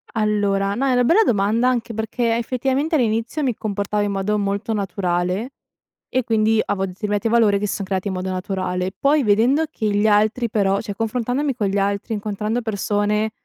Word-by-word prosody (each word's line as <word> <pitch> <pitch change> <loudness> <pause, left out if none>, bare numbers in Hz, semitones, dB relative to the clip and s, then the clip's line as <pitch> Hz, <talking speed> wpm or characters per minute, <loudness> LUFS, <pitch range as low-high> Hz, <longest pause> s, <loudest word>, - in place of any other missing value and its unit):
Allora, 205 -2 +1
no, 270 - 0
è - - +2
una 245 -1 +3
bella 375 - +5
domanda 220 - +2
anche 235 -2 -2
perché 225 +1 -1
effettivamente 265 +6 -1
all'inizio 230 +3 0
mi 250 -4 0
comportavo 205 0 -2
in 205 - -1
modo 200 +2 0
molto 200 +3 -1
naturale 190 +2 -1 0.6
e 255 - 0
quindi 220 -1 +2
avo 195 -1 -1
determinati 205 +3 -2
valori 220 -3 +3
che 210 - -1
son 200 - -3
creati 190 +1 -2
in 195 - -2
modo 185 0 -3
naturale. 185 0 -2
Poi 290 +1 +3
vedendo 235 +9 +3
che 220 -9 -2
gli 205 +1 +2
altri 215 +3 +2
però 200 -2 +1
cioè 205 -2 -6
confrontandomi 245 +5 -1
con 215 -5 -1
gli 195 +1 -1
altri, 200 +2 -1
incontrando 210 +2 -2
persone 210 0 0
215 Hz, 180 wpm, -21 LUFS, 200-235 Hz, 0.6 s, bella